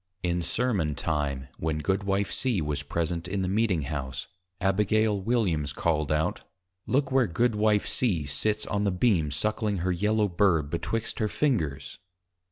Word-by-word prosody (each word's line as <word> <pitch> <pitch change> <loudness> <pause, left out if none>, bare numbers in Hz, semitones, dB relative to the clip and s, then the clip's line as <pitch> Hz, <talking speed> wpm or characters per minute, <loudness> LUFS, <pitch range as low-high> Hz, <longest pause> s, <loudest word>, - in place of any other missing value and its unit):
_ - - -54 0.2
In 85 0 0
Sermon 90 - 0
time, 70 -4 -2
when 80 -1 -1
Goodwife 95 +4 0
C. 115 +2 +1
was 75 -2 -2
present 85 +3 -2
in 95 +1 -1
the - - -1
Meeting 95 -5 +1
House, 65 -3 -4 0.3
Ab. 95 -1 +1
W. 105 -4 +1
called 75 -3 0
out, 75 +1 0 0.5
_Look 135 +1 +1
where 130 -3 +3
Goodwife 105 +2 +2
C. 90 - +1
sits 105 +10 +1
on 105 0 -1
the 100 - +2
Beam 90 -5 +2
suckling 105 +5 0
her 95 - +2
Yellow 105 +4 +1
Bird 85 -6 +2
betwixt 110 +6 -3
her 110 - +1
fingers! 95 - -1
95 Hz, 155 wpm, -27 LUFS, 80-110 Hz, 0.5 s, where